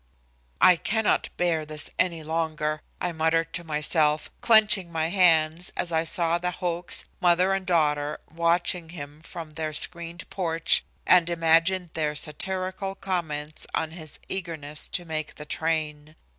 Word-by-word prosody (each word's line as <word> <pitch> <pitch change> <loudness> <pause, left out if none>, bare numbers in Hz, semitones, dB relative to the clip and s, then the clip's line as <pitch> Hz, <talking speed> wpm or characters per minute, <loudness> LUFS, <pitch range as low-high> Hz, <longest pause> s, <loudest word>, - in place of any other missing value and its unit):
"I 180 -1 +7
cannot 220 +5 +1
bear 170 -3 +1
this 150 -1 -5
any 170 -3 +1
longer," 155 -1 -2 0.2
I 175 - -1
muttered 160 0 0
to 170 - -2
myself, 150 -1 +1
clenching 210 -6 +5
my 160 0 -1
hands, 170 -2 +3
as 175 - -2
I 160 0 +1
saw 170 -1 +1
the 180 0 -1
Hochs, 175 0 -1
mother 180 +2 +3
and 195 -1 -3
daughter, 150 -3 +1
watching 170 +1 +1
him 150 -2 -9
from 165 -1 -8
their 155 0 -4
screened 170 +2 -2
porch, 165 -3 +2 0.2
and 175 -2 +5
imagined 170 +1 +2
their 150 -2 -1
satirical 185 +5 -3
comments 155 -6 -3
on 160 - -1
his 160 -3 -8
eagerness 160 -5 -2
to 175 - -3
make 155 -2 -4
the 150 - -9
train. 155 -1 -2
165 Hz, 145 wpm, -26 LUFS, 155-180 Hz, 0.2 s, I